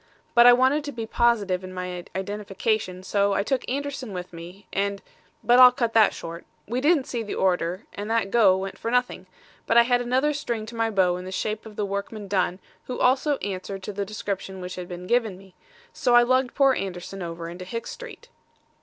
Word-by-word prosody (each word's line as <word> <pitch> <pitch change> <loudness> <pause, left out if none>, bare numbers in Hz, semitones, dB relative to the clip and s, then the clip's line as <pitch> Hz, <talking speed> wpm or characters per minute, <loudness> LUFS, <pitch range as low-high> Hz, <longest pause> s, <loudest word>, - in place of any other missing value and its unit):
But 235 0 +7
I 245 - +10
wanted 260 +4 +3
to 290 - -4
be 230 -4 -5
positive 210 -6 +1
in 185 0 -8
my 180 -1 -5
identification, 200 -1 -2
so 200 +1 +1
I 200 - +1
took 260 +3 -1
Anderson 275 -4 -4
with 180 -1 -6
me, 175 +4 -10
and 200 0 -1 0.4
but 245 +1 +5
I'll 250 -1 +10
cut 240 -3 -1
that 220 -2 +6
short. 170 +1 -8 0.2
We 245 +4 -2
didn't 300 0 +3
see 240 - -3
the 210 - -5
orator 180 0 0
and 205 +1 -6
that 225 -4 0
'go' 200 -6 +5
went 195 +1 -5
for 230 - -3
nothing; 245 -6 0 0.4
but 230 - +3
I 235 - +9
had 245 0 +2
another 260 +5 +1
string 235 -7 -3
to 230 +2 -10
my 225 0 +1
bow 185 -4 +2
in 180 - -8
the 185 - -6
shape 215 +3 -3
of 215 - -12
the 205 - -1
workman 200 +1 -5
Dunn 185 -2 0 0.3
who 250 - -5
also 265 +3 +3
answered 195 0 -5
to 210 - -5
the 200 +1 -2
description 195 -2 -5
which 180 0 -6
had 180 -1 -6
been 180 0 -7
given 225 -3 +1
me; 190 -1 -17 0.4
so 245 -2 +2
I 240 - +8
lugged 255 0 +1
poor 275 -1 +5
Anderson 190 -2 -5
over 165 -1 -5
into 175 +2 -8
Hicks 230 +6 -5
Street. - - -10
210 Hz, 215 wpm, -25 LUFS, 185-245 Hz, 0.4 s, I